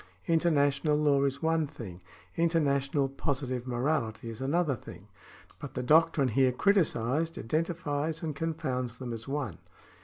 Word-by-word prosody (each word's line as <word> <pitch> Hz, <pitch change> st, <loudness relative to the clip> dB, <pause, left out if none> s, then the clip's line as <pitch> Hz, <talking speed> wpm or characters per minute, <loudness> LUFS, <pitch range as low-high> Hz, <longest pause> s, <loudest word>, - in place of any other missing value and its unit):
International 150 Hz, -3 st, +2 dB
law 145 Hz, -2 st, +3 dB
is 140 Hz, +1 st, -2 dB
one 160 Hz, -1 st, +2 dB
thing, 110 Hz, -, -9 dB, 0.3 s
interna 165 Hz, -4 st, +2 dB
tional 135 Hz, -2 st, 0 dB
positive 130 Hz, -3 st, -2 dB
morality 120 Hz, -3 st, -1 dB
is 115 Hz, -, -8 dB
another 145 Hz, +1 st, +1 dB
thing; 100 Hz, -2 st, -12 dB, 0.5 s
but -, -, -8 dB
the 125 Hz, -, -2 dB
doctrine 155 Hz, 0 st, +4 dB
here 130 Hz, +3 st, +3 dB
criticised 160 Hz, -, +1 dB
identifies 155 Hz, -, -2 dB
and 155 Hz, -3 st, -3 dB
confounds 130 Hz, -7 st, -2 dB
them 125 Hz, -2 st, -5 dB
as 115 Hz, 0 st, -7 dB
one. 135 Hz, -, -3 dB
140 Hz, 140 wpm, -30 LUFS, 125-160 Hz, 0.5 s, doctrine